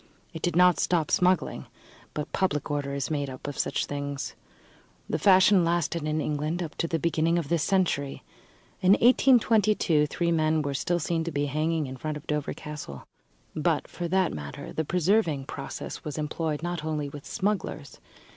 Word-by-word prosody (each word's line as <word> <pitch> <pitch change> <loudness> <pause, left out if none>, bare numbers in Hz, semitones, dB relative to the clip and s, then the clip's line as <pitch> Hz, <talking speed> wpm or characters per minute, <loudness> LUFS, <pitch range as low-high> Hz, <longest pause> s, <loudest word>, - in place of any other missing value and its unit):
It 160 - -7
did 175 -2 -1
not 180 0 +5
stop 165 -4 +1
smuggling; 180 -1 +1 0.5
but 150 - -4
public 150 -7 0
order 140 -1 -2
is 140 +2 -3
made 145 -2 -1
up 130 -1 -9
of 145 - -4
such - - 0
things. 140 -1 -4 0.7
The - - -1
fashion 190 -1 +6
lasted 170 -2 0
in 155 +1 0
England 155 +4 -1
up 160 - -6
to 165 - +1
the 165 - 0
beginning 165 +1 +1
of 160 -5 -2
this 170 -2 +1
century. 160 -6 0 0.6
In 185 +1 +6
1822 215 - +4
three 170 +3 -1
men 155 -1 +2
were 140 -1 -2
still 175 +5 0
to 165 +1 -1
be 145 -1 -1
seen - - 0
hanging 155 +2 0
in 130 0 -7
front 155 +2 -4
of 150 - -12
Dover 150 -1 -2
Castle. 150 - -8 0.5
But, - - 0
for 175 - -5
that 185 0 +1
matter, 70 -1 -7
the 160 - -1
preserving 170 -4 +1
process - - -6
was 150 -2 -5
employed 155 0 -2
not 175 -2 -3
only 155 -2 -2
with 140 0 -9
smugglers. 190 -7 -3
160 Hz, 175 wpm, -27 LUFS, 145-175 Hz, 0.7 s, fashion